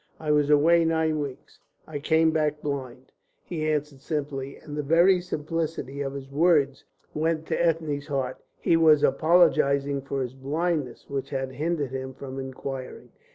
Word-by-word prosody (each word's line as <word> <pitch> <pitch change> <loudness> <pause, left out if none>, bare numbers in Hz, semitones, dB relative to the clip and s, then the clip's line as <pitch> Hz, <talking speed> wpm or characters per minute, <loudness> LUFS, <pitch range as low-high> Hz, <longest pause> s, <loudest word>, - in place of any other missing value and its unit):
"I 155 -1 -1
was 150 -1 +3
away 165 +3 +5
nine 160 -1 +1
weeks. 140 -3 -7 0.3
I 150 -2 -5
came 160 +2 +3
back 150 -1 0
blind," 130 -3 -5 0.3
he 155 -3 -3
answered 150 -3 -2
simply, 140 -3 -4
and 150 - -9
the 150 - -1
very 170 +5 +4
simplicity 155 -4 -3
of 135 -1 -3
his 135 -1 -8
words 145 -3 +2 0.3
went 160 +1 0
to - - +1
Ethne's 160 -4 0
heart. 135 -3 -2 0.2
He 165 - +2
was 155 -3 +5
apologising 140 -2 +3
for 135 0 -3
his 125 0 -6
blindness, 150 +2 -2
which 140 -1 -4
had 135 -1 -3
hindered 150 -1 -2
him 130 0 -5
from 135 -1 -7
inquiring. 130 0 -7
145 Hz, 155 wpm, -26 LUFS, 135-160 Hz, 0.3 s, away